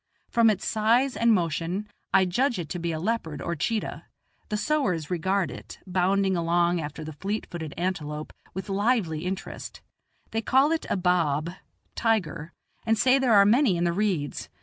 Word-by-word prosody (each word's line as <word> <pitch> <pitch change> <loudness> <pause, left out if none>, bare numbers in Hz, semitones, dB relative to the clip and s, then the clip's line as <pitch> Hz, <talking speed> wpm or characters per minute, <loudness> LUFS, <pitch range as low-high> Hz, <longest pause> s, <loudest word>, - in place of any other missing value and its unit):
From 230 -2 +5
its 205 -3 -1
size 235 +5 +2
and 235 0 +3
motion, 175 +1 0 0.2
I 190 0 +5
judge 240 +8 +1
it 170 -4 -5
to 180 - -4
be 170 0 -2
a 160 - -3
leopard 170 -6 -2
or 170 - -3
cheetah; 215 +8 -2 0.4
the 210 - -1
sowars 210 - 0
regard 180 -1 0
it, 125 - -10
bounding 190 +1 +1
along 170 0 +2
after 150 +1 -6
the 155 0 -7
fleet 200 +9 -3
footed 160 -4 -6
antelope, 155 -4 -3 0.2
with 190 -1 -5
lively 195 -6 0
interest; 190 +1 -6 0.5
they 225 - -1
call 265 +6 +3
it 330 - -1
a - - +1
"baab" 170 -3 +1 0.4
(tiger), 170 -8 -1 0.3
and 225 0 +2
say 255 +5 +4
there 250 -5 +4
are 200 -1 +7
many 225 -3 +4
in 170 - 0
the 170 -1 +1
reeds. 180 -8 -1
185 Hz, 170 wpm, -26 LUFS, 165-220 Hz, 0.5 s, are